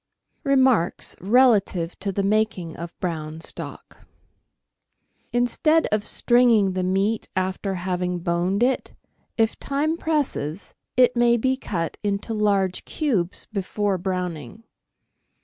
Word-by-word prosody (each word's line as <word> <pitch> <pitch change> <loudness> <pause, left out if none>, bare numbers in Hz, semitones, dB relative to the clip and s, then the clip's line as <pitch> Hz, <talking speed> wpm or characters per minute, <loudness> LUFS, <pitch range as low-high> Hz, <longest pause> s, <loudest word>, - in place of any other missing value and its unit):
Remarks 260 - +2
Relative 200 -6 +3
to 200 0 -2
the 195 +1 -1
Making 195 -5 0
of 170 +1 -9
Brown 160 -3 -4
Stock. - - -7 0.6
— - - -47
Instead 305 +7 +2
of 210 0 0
stringing 240 -5 +4
the 185 - -1
meat 195 +4 0
after 190 +1 -2
having 180 0 -2
boned 175 +5 0
it, 260 +1 0 0.4
if 225 -1 +1
time 300 +4 -1
presses, 265 - -2 0.2
it 250 -1 +5
may 240 0 +4
be 260 +3 +1
cut 175 -10 -4
into 205 +2 -2
large 200 -3 +1
cubes 205 - 0
before 200 -1 -1
browning. 180 - -4
200 Hz, 115 wpm, -23 LUFS, 180-240 Hz, 0.6 s, it